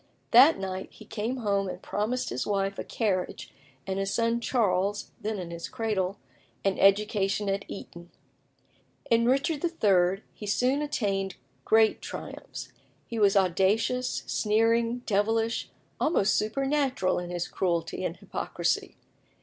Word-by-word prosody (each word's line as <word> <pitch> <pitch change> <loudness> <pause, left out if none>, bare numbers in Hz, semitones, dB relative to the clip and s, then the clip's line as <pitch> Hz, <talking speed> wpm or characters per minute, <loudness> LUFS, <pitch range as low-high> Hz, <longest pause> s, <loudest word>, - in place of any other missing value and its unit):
That 265 +7 +8
night 190 -1 -4
he 215 - -14
came 220 +4 -3
home 200 -4 0
and - - -6
promised 230 +5 -2
his 125 - -2
wife 195 -1 -1
a - - -2
carriage, 190 -5 -2 0.3
and 190 0 -2
his 195 0 -1
son 230 0 +1
Charles 205 -4 0
(then 215 0 -2
in 175 -3 -6
his 170 0 -6
cradle) 210 -6 -1 0.5
an 195 -1 +1
education 205 0 +3
at 195 +1 -1
Eton. 170 -3 -9 1.0
In 230 0 +4
Richard 280 +4 +1
III. 195 - +2
he 210 - -8
soon 255 +7 +2
attained 195 -9 -1 0.3
great 220 0 +4
triumphs. - - -7 0.3
He 230 - -4
was 200 -1 +4
audacious, 195 +7 +1
sneering, 230 +3 +1
devilish, 225 +2 +1 0.3
almost 260 - +2
supernatural 270 -3 +1
in 175 0 -6
his 175 -1 -3
cruelty 170 -3 -1
and - - -3
hypocrisy. - - -2
210 Hz, 135 wpm, -28 LUFS, 195-230 Hz, 1.0 s, That